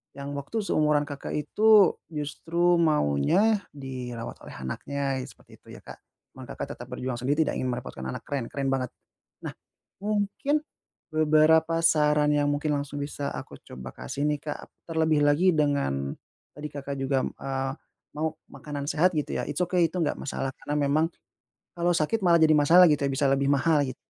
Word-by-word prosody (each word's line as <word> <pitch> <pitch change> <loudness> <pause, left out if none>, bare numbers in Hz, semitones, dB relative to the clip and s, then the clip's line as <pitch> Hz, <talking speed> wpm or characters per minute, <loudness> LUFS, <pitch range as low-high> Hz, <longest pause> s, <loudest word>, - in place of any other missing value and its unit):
yang 140 0 -6
waktu 210 +11 -3
seumuran 150 -5 +2
Kakak, 145 -1 -6
itu 210 +4 +5 0.2
justru 170 +3 0
maunya, 155 - +3 0.2
dirawat 125 -4 -6
oleh - - -10
anaknya 135 - -3
seperti - - -17
itu - - -28
ya, - - -14
Kak. - - -11 0.3
Cuman, - - -11
Kakak, - - -6
tetep - - -10
berjuang 125 -1 -4
sendiri, 145 +6 +2
tidak - - -2
ingin 130 - -1
merepotkan 125 - -5
anak 65 - -5
keren 135 -5 -3
keren 135 -1 -2
banget. 130 -1 0 0.6
Nah, - - -4 0.5
mungkin 210 +8 0 0.5
beberapa 155 +1 +3
saran 150 -2 +3
yang 145 -1 +2
mungkin 150 +1 -2
langsung 145 0 -5
bisa 145 0 -4
aku - - -8
coba 65 0 -9
kasih 140 - -2
nih, 150 - 0
Kak, 150 - -4 0.3
terlebih 160 -2 +2
lagi 150 +6 +4
dengan, 140 - 0 0.4
tadi 150 +1 -6
Kakak, 140 -1 -6
juga 135 0 +1
eee, 135 0 -3 0.4
mau 155 +1 -2
makanan 145 -1 -6
sehat 175 +4 +3
gitu 150 - -2
ya - - -2
it's - - -4
okay, 180 -1 +2
itu 180 - -6
enggak 155 - +1
masalah 135 -1 -4
karena 145 +2 -4
memang, 150 +3 +2 0.7
kalau 175 +1 +2
sakit 170 +7 0
malah 170 -2 +5
jadi 155 -1 +5
masalah 170 +5 +7
gitu 150 -2 +1
ya, 140 - +1
bisa 140 +1 +1
lebih 135 +1 +2
mahal 145 +1 +3
gitu. 130 -2 -6
145 Hz, 170 wpm, -26 LUFS, 135-160 Hz, 0.7 s, masalah